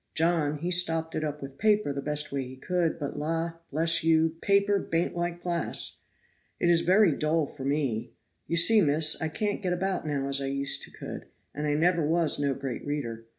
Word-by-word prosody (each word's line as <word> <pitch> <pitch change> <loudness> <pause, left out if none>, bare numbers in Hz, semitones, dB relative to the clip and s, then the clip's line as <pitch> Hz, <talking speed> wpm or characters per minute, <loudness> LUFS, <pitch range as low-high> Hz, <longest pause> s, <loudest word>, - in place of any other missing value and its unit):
John, 160 -3 +1
he 175 +4 -3
stopped 165 -2 +2
it 155 - -2
up 150 -1 -4
with 135 0 -10
paper 210 -8 +2
the 140 - -4
best 150 +1 -3
way 140 -1 -2
he 130 0 -8
could, 170 +4 -1
but 145 0 -5
la, 165 +2 -2 0.2
bless 165 +3 +3
you, 160 0 +3
paper 200 0 +3
baint 165 -1 -2
like 175 0 -3
glass. 175 -1 -2 0.6
It 175 - +3
is 170 -1 +4
very 190 +1 +4
dull 155 +2 0
for 135 -1 -9
me. 135 -6 -1 0.4
You 170 - 0
see, 215 +6 +6
miss, 155 0 +3
I 160 - 0
can't 205 +7 -3
get 180 -3 -1
about 185 -2 -2
now 140 -2 -2
as 140 0 +1
I 135 - -2
used 140 0 0
to - - -15
could, - - -8 0.3
and 150 +1 -3
I 145 - +1
never 170 +1 +2
was 160 0 +2
no 140 -2 0
great 135 -2 -5
reader. 115 -6 -4
160 Hz, 205 wpm, -27 LUFS, 145-175 Hz, 0.6 s, see